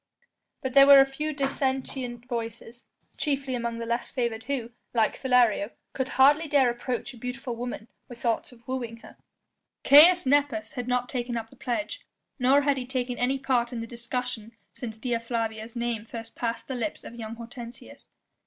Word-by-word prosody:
But 260 -1 -2
there 275 0 +8
were 280 -1 +10
a 270 - +8
few 300 +3 -3
dissentient 265 -3 -2
voices, 235 0 -6 0.3
chiefly 275 -3 -1
among 235 -1 -2
the 230 - -4
less 235 +1 -2
favoured 235 -3 -2
who, 250 -4 -3 0.2
like 225 -2 +3
Philario, 245 -6 +3 0.2
could 260 -1 -2
hardly 290 +4 +6
dare 275 -4 +4
approach 245 +1 -4
a - - -13
beautiful 250 0 -4
woman 240 -2 -5 0.2
with 240 -1 -10
thoughts 235 0 -1
of 235 -1 -19
wooing 245 -3 -3
her. - - -14 0.7
Caius 340 +5 +8
Nepos 275 -5 +1
had 245 -1 -4
not 250 0 +1
taken 240 -2 -3
up 225 -1 -6
the - - -15
pledge, 300 - -3 0.4
nor 265 +3 +5
had 285 -1 +2
he 250 -1 -4
taken 250 -1 -2
any 260 +2 +1
part 255 -3 +1
in 240 - -4
the 230 - -4
discussion 235 -1 -4 0.2
since 225 -3 -7
Dea 235 0 -1
Flavia's 225 -1 -3
name 235 -2 -2
first 225 0 -9
passed 230 -1 -3
the 265 - -3
lips 230 -4 -3
of - - -9
young 225 -1 -6
Hortensius. 235 +1 -10
245 Hz, 180 wpm, -27 LUFS, 235-265 Hz, 0.7 s, were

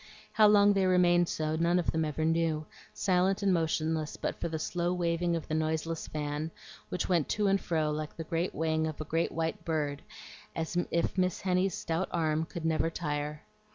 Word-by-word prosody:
How 215 -1 +6
long 205 -1 +6
they 195 -1 +2
remained 175 -1 +4
so 155 0 -1
none 170 +2 +2
of 175 - +1
them 160 0 0
ever 155 +1 -1
knew, 160 -1 +1 0.3
silent 190 +1 +1
and 195 -2 +4
motionless 160 -2 0
but - - -2
for 170 - -1
the 160 - -2
slow 175 +2 -1
waving 170 0 0
of 165 - -4
the - - -4
noiseless 160 +1 -1
fan, 150 +1 -3 0.4
which 180 - -2
went 170 -5 +1
to 210 - +1
and 195 0 +3
fro 155 -3 0
like 150 0 -4
the 165 - -5 0.3
wing 160 0 0
of 155 - -6
a 155 - -4
great 165 +3 0
white 160 0 -2
bird, 150 -3 -1 0.5
as 165 +1 -3
if 170 +2 0
Miss 185 -1 +1
Henny's 185 -1 +1
stout 165 +3 -2
arm 160 -1 +1
could 165 0 -6
never 160 0 +1
tire. 150 -2 -3
165 Hz, 190 wpm, -30 LUFS, 155-180 Hz, 0.5 s, How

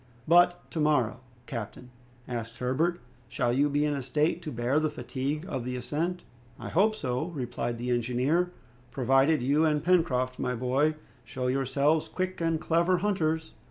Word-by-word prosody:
"But 175 +1 +4
to 165 - -3
morrow, 145 -7 +2 0.3
captain," 125 0 -7 0.4
asked 115 -1 -5
Herbert, 155 +9 0 0.3
"shall 120 0 0
you 145 +3 +3
be 145 +1 +1
in 150 - +1
a 140 - -2
state 150 +6 0
to 155 - -6
bear 120 +4 +1
the 155 0 +1
fatigue 150 +1 -4
of 130 - -3
the 125 +1 -3
ascent?" 165 +8 -2 0.4
"I - - -6
hope 215 +5 +3
so," 130 -5 -2
replied 125 -7 -4
the 125 +1 -3
engineer, 125 +9 +1 0.4
"provided 135 +3 +3
you 145 +5 +3
and 150 -2 +2
Pencroft, 145 -8 +2
my 125 0 -1
boy, 135 +6 +1 0.3
show 125 +1 -5
yourselves 135 +4 +1
quick 185 -1 -3
and 165 -1 +1
clever 170 +3 +2
hunters." 160 -5 -1
145 Hz, 160 wpm, -28 LUFS, 125-165 Hz, 0.4 s, But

